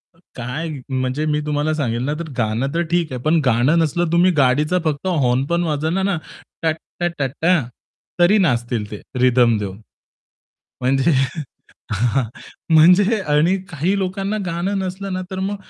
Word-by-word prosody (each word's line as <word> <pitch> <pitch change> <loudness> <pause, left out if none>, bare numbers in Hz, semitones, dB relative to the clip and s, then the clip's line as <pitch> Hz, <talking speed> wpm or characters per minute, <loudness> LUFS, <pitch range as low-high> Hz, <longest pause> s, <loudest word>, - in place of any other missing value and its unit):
अ, - - -27 0.2
काय 130 +7 -4 0.2
म्हणजे 130 +3 -1
मी 150 -1 +1
तुम्हाला 150 +1 0
सांगेल 120 -5 -1
ना 145 - -1
तर 170 -2 -5
गाणं 115 +2 0
तर 170 - +1
ठीक 175 -3 +1
आहे. 125 - -5
पण 160 +5 +2
गाणं 130 +6 +3
नसलं 165 +1 0
तुम्ही 175 +2 +4
गाडीचा 150 +7 +2
फक्त 155 +3 -1
हॉर्न 135 -7 +1
पण 170 0 +1
वाजवला 160 +4 -1
ना 195 -2 +1 0.5
टट् 160 -1 +1 0.2
टा 175 - +1
टटटा 160 +6 +1 0.6
तरी 175 +5 +5
नाचतील 120 - 0
ते 105 - -7 0.2
रिथम 125 -2 +4
देऊन. 100 -1 -5 1.0
म्हणजे 135 +5 +2 0.8
हां, 120 +5 +1 0.5
म्हणजे 185 +7 +5
आणि 150 +6 +3
काही 170 +5 0
लोकांना 195 +2 -2
गाणं 175 +4 -2
नसलं 190 +1 -4
ना 185 - -2
तर 190 - -4
मग 195 +2 -2
155 Hz, 155 wpm, -20 LUFS, 130-175 Hz, 1.0 s, तरी